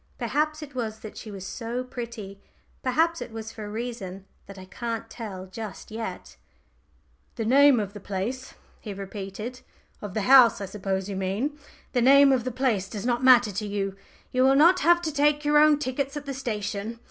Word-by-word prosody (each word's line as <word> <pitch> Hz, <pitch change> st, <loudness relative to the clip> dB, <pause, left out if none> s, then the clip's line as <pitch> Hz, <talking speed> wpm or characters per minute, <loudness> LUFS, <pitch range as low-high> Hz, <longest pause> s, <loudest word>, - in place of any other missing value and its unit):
Perhaps 305 Hz, +1 st, -1 dB
it 290 Hz, -1 st, -11 dB
was 220 Hz, -3 st, -4 dB
that 215 Hz, -2 st, -9 dB
she 220 Hz, -, -9 dB
was 195 Hz, -2 st, -8 dB
so 235 Hz, +5 st, -4 dB
pretty 230 Hz, -6 st, -8 dB, 0.4 s
perhaps 325 Hz, +6 st, +1 dB
it -, -, -6 dB
was 225 Hz, 0 st, -7 dB
for 215 Hz, -, -8 dB
a -, -, -7 dB
reason 210 Hz, -4 st, -6 dB, 0.2 s
that 200 Hz, 0 st, -11 dB
I 185 Hz, -, -10 dB
can't 230 Hz, +3 st, -5 dB
tell 195 Hz, -6 st, -7 dB
just 215 Hz, +2 st, -8 dB
yet. 225 Hz, +1 st, -6 dB, 1.0 s
"The 225 Hz, -, -3 dB
name 275 Hz, +1 st, +6 dB
of 200 Hz, -2 st, -4 dB
the 205 Hz, -, -8 dB
place," 205 Hz, +7 st, -4 dB, 0.2 s
he 205 Hz, -3 st, -7 dB
repeated 200 Hz, +5 st, -7 dB, 0.4 s
"of 205 Hz, -3 st, -7 dB
the 215 Hz, -, 0 dB
house, 255 Hz, -1 st, +7 dB
I 200 Hz, -, -4 dB
suppose 195 Hz, -1 st, -3 dB
you 200 Hz, -, -4 dB
mean? 195 Hz, +10 st, -2 dB, 0.4 s
The 245 Hz, -, +1 dB
name 275 Hz, +2 st, +7 dB
of 250 Hz, -3 st, +1 dB
the 255 Hz, -, -2 dB
place 230 Hz, -7 st, 0 dB
does 210 Hz, 0 st, -6 dB
not 240 Hz, 0 st, 0 dB
matter 245 Hz, -4 st, +6 dB
to 210 Hz, +2 st, -4 dB
you. 195 Hz, -1 st, -2 dB, 0.4 s
You 255 Hz, -, +1 dB
will 265 Hz, +1 st, +5 dB
not 340 Hz, +6 st, +6 dB
have 345 Hz, +2 st, +4 dB
to 315 Hz, -2 st, -2 dB
take 295 Hz, +1 st, +2 dB
your 295 Hz, 0 st, +5 dB
own 300 Hz, -1 st, +6 dB
tickets 275 Hz, 0 st, -3 dB
at 290 Hz, -, -6 dB
the 275 Hz, -, -4 dB
station. 215 Hz, -3 st, -4 dB
230 Hz, 195 wpm, -26 LUFS, 200-270 Hz, 1.0 s, house